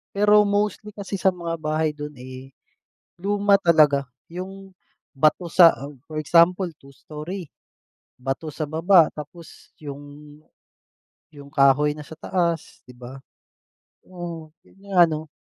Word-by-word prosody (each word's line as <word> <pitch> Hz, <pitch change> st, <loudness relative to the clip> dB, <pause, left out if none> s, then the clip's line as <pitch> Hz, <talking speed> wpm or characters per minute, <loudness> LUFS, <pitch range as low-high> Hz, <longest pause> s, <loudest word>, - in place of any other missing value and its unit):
Pero 210 Hz, +1 st, +5 dB
mostly 205 Hz, +1 st, -1 dB
kasi 200 Hz, -1 st, -7 dB
sa 190 Hz, -, +5 dB
mga 170 Hz, -2 st, -5 dB
bahay 155 Hz, 0 st, -1 dB
do'n, 150 Hz, 0 st, -8 dB
eh, 130 Hz, +1 st, -10 dB, 0.7 s
luma 200 Hz, +1 st, +2 dB
talaga. 155 Hz, -7 st, +4 dB, 0.2 s
Yung 190 Hz, +2 st, -9 dB, 0.4 s
bato 155 Hz, +5 st, +2 dB
sa 170 Hz, 0 st, +7 dB, 0.4 s
for 155 Hz, -, -3 dB
example 175 Hz, +4 st, +3 dB
two 140 Hz, -1 st, -18 dB
story, 155 Hz, +6 st, -8 dB, 0.7 s
bato 135 Hz, +5 st, -4 dB
sa 155 Hz, +1 st, -4 dB
baba 165 Hz, +3 st, +4 dB
tapos 165 Hz, +3 st, -12 dB
yung 145 Hz, +1 st, -11 dB, 0.9 s
yung 140 Hz, -2 st, -14 dB
kahoy 140 Hz, 0 st, +4 dB
na 150 Hz, -, -9 dB
sa 160 Hz, -, -10 dB
taas, 170 Hz, 0 st, -2 dB
'di 125 Hz, -, -14 dB
ba? 125 Hz, +2 st, -10 dB, 0.9 s
Oo, 170 Hz, -3 st, -8 dB
yun -, -, -24 dB
nga 190 Hz, -3 st, +4 dB
ano. 160 Hz, -2 st, +1 dB
160 Hz, 130 wpm, -23 LUFS, 150-185 Hz, 0.9 s, sa